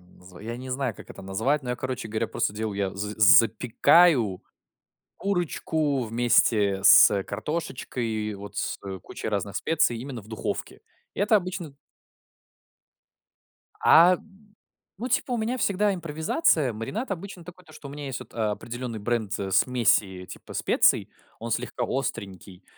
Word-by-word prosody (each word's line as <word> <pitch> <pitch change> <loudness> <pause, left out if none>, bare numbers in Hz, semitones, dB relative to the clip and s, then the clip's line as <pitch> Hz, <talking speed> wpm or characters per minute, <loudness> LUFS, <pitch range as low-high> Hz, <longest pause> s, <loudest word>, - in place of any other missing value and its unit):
как - - -24
оно 90 - -23
называ 90 -1 -15
я 115 +2 -6
не 130 +1 -8
знаю, 130 -4 -2
как - - -13
это - - -11
назвать. 110 +10 -1
Ну, 125 - -8
я, 125 - -1
короче 130 -2 -5
говоря, 110 0 -2
просто 115 -3 -2
делаю: 110 -1 -3
я 95 -1 -2
з 105 +1 -4
запекаю 115 - +5 0.7
курочку 160 -7 -1
вместе 110 -4 +2
с 100 0 +7
картошечкой 130 +1 -4
и 110 -1 -2
и - - -7
вот 100 +1 -10
с - - -3 0.2
кучей - - -7
разных 100 -1 -3
специй 160 -7 +1
именно 125 -2 -7
в 105 - -18
духовке. 110 - -5 0.3
И - - -5
это 210 +2 +4
обычно 180 -6 -4 2.1
А, 175 +2 +6 0.8
ну, 235 +5 -4
типа, 255 - 0
у 240 - 0
меня 230 +4 -2
всегда 205 -2 +1
импровизация. 160 - 0
Маринад 200 - -5
обычно 190 -1 -7
такой, 180 +1 -13
то, 155 - -17
что 145 - -10
у - - -9
меня 145 0 -7
есть 135 -1 -5
вот, 125 - -13
э, - - -12
определенный 115 +2 -3
бренд, 110 -1 -2
э, 95 -1 -4
смеси 100 -6 +2
типа - - -11
специй, - - +2 0.3
он 115 +1 -6
слегка 125 0 -2
остренький. 100 -8 -5
120 Hz, 160 wpm, -25 LUFS, 105-160 Hz, 2.1 s, с